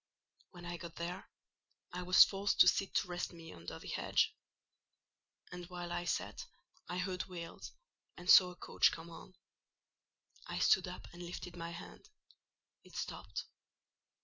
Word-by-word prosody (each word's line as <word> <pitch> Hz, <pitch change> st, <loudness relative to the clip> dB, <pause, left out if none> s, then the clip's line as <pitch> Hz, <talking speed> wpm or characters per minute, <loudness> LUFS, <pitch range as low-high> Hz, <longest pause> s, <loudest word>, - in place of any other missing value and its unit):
When 175 Hz, -1 st, -11 dB
I 175 Hz, 0 st, -4 dB
got 170 Hz, -1 st, -9 dB
there, 175 Hz, +2 st, -5 dB, 0.6 s
I 180 Hz, -, -3 dB
was 180 Hz, +1 st, +9 dB
forced 200 Hz, +1 st, -1 dB
to -, -, +9 dB
sit 195 Hz, -, +2 dB
to -, -, +2 dB
rest 175 Hz, 0 st, -3 dB
me 165 Hz, -1 st, -10 dB
under 85 Hz, 0 st, -8 dB
the -, -, -11 dB
hedge; -, -, +1 dB, 1.2 s
and 180 Hz, -1 st, -7 dB
while 175 Hz, -1 st, -6 dB
I 175 Hz, -, -2 dB
sat, -, -, -2 dB, 0.4 s
I 180 Hz, -, -2 dB
heard 180 Hz, 0 st, -2 dB
wheels, 170 Hz, -3 st, -8 dB, 0.5 s
and 175 Hz, -, -10 dB
saw 180 Hz, 0 st, +9 dB
a 180 Hz, -, -10 dB
coach -, -, +3 dB
come 165 Hz, +1 st, -8 dB
on. 185 Hz, +3 st, -12 dB, 1.1 s
I -, -, -4 dB
stood 190 Hz, -1 st, +4 dB
up 180 Hz, -, -8 dB
and 175 Hz, -, -10 dB
lifted 175 Hz, 0 st, -6 dB
my 170 Hz, -1 st, -5 dB
hand; 170 Hz, -, -10 dB, 0.7 s
it -, -, -16 dB
stopped. -, -, -4 dB
175 Hz, 155 wpm, -35 LUFS, 170-180 Hz, 1.2 s, was